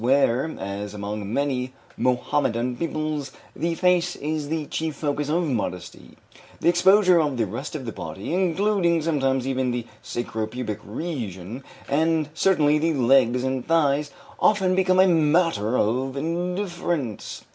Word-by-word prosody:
Where, 135 Hz, +3 st, +2 dB
as 100 Hz, +1 st, -5 dB
among 105 Hz, 0 st, -5 dB
many 130 Hz, -1 st, -1 dB, 0.2 s
Mohammedan 125 Hz, -1 st, 0 dB
peoples, 155 Hz, -2 st, -3 dB, 0.2 s
the 170 Hz, +1 st, -1 dB
face 180 Hz, 0 st, +2 dB
is 150 Hz, 0 st, -3 dB
the 160 Hz, -1 st, -2 dB
chief 160 Hz, +1 st, -3 dB
focus 145 Hz, 0 st, -2 dB
of 170 Hz, +3 st, +1 dB
modesty, 90 Hz, -, -4 dB, 0.4 s
the -, -, +3 dB
exposure 185 Hz, +1 st, +5 dB
of 145 Hz, -4 st, -1 dB
the 115 Hz, -, +1 dB
rest 130 Hz, +10 st, -6 dB
of 135 Hz, -4 st, -5 dB
the 115 Hz, -, -4 dB
body, 100 Hz, -, -6 dB
including 180 Hz, -2 st, +2 dB
sometimes 135 Hz, -5 st, 0 dB
even 130 Hz, -1 st, 0 dB
the 120 Hz, -1 st, -2 dB, 0.2 s
sacro 110 Hz, -2 st, -3 dB
pubic 110 Hz, -2 st, -4 dB
region, 115 Hz, -, -5 dB, 0.2 s
and 155 Hz, +1 st, +1 dB
certainly 155 Hz, -4 st, +3 dB
the 160 Hz, 0 st, +1 dB
legs 125 Hz, -1 st, +3 dB
and 130 Hz, -1 st, -2 dB
thighs, 150 Hz, -3 st, +2 dB, 0.3 s
often 190 Hz, -3 st, +3 dB
becomes 185 Hz, 0 st, +4 dB
a 190 Hz, -, +5 dB
matter 155 Hz, -, +2 dB
of 130 Hz, +5 st, 0 dB
indifference. 175 Hz, -, -3 dB
145 Hz, 140 wpm, -24 LUFS, 125-165 Hz, 0.4 s, exposure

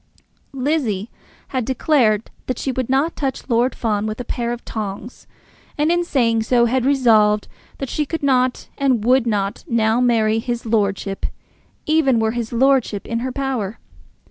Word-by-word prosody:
Lizzie 250 Hz, -7 st, -1 dB, 0.4 s
had 260 Hz, -2 st, -1 dB
declared 235 Hz, -4 st, +1 dB, 0.2 s
that 255 Hz, -, -2 dB
she 270 Hz, -, -2 dB
would 255 Hz, -1 st, -3 dB
not 275 Hz, +5 st, +1 dB
touch 270 Hz, -3 st, -3 dB
Lord 240 Hz, +1 st, +1 dB
Fawn 215 Hz, -2 st, -1 dB
with 215 Hz, +2 st, -4 dB
a -, -, -3 dB
pair 235 Hz, 0 st, -2 dB
of 240 Hz, 0 st, -6 dB
tongs, 215 Hz, +2 st, -6 dB, 0.5 s
and 300 Hz, +2 st, +2 dB
in 350 Hz, 0 st, +2 dB
saying 235 Hz, -8 st, +1 dB
so 235 Hz, +2 st, +3 dB
had 255 Hz, +2 st, +1 dB
resolved 220 Hz, -6 st, +4 dB, 0.3 s
that 275 Hz, -, -4 dB
she 300 Hz, +3 st, -2 dB
could 325 Hz, 0 st, -4 dB
not 255 Hz, -2 st, +1 dB
and 255 Hz, -6 st, +1 dB
would 250 Hz, 0 st, +4 dB
not 200 Hz, -3 st, -1 dB
now 225 Hz, 0 st, +2 dB
marry 225 Hz, -3 st, +2 dB
his 240 Hz, 0 st, -4 dB
lordship 200 Hz, -3 st, -1 dB, 0.6 s
even 300 Hz, -6 st, +3 dB
were 220 Hz, 0 st, +1 dB
his 235 Hz, -1 st, -4 dB
lordship 245 Hz, -4 st, +2 dB
in 230 Hz, 0 st, -2 dB
her 255 Hz, +2 st, -3 dB
power. 250 Hz, -6 st, -3 dB
240 Hz, 165 wpm, -20 LUFS, 220-265 Hz, 0.6 s, resolved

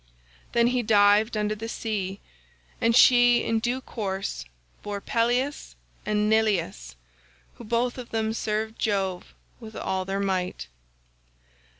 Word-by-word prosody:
"Then 235 Hz, 0 st, +4 dB
he 250 Hz, -, +1 dB
dived 210 Hz, +1 st, +4 dB
under 210 Hz, 0 st, 0 dB
the 225 Hz, +2 st, -6 dB
sea, 200 Hz, -4 st, -3 dB, 0.6 s
and 230 Hz, 0 st, +3 dB
she 245 Hz, -1 st, +6 dB
in 225 Hz, -, 0 dB
due 245 Hz, +3 st, -2 dB
course 195 Hz, -6 st, -4 dB, 0.4 s
bore 205 Hz, -1 st, -5 dB
Pelias 245 Hz, +7 st, -1 dB, 0.3 s
and 210 Hz, 0 st, +1 dB
Neleus, 185 Hz, -, 0 dB, 0.6 s
who -, -, -10 dB
both 240 Hz, +3 st, -1 dB
of 245 Hz, -, -8 dB
them 220 Hz, -1 st, -1 dB
served 220 Hz, 0 st, -3 dB
Jove 195 Hz, -4 st, -2 dB, 0.2 s
with 220 Hz, -2 st, -11 dB
all 190 Hz, 0 st, -2 dB
their 195 Hz, +1 st, -2 dB
might. 185 Hz, -, -2 dB
215 Hz, 125 wpm, -25 LUFS, 195-230 Hz, 0.6 s, she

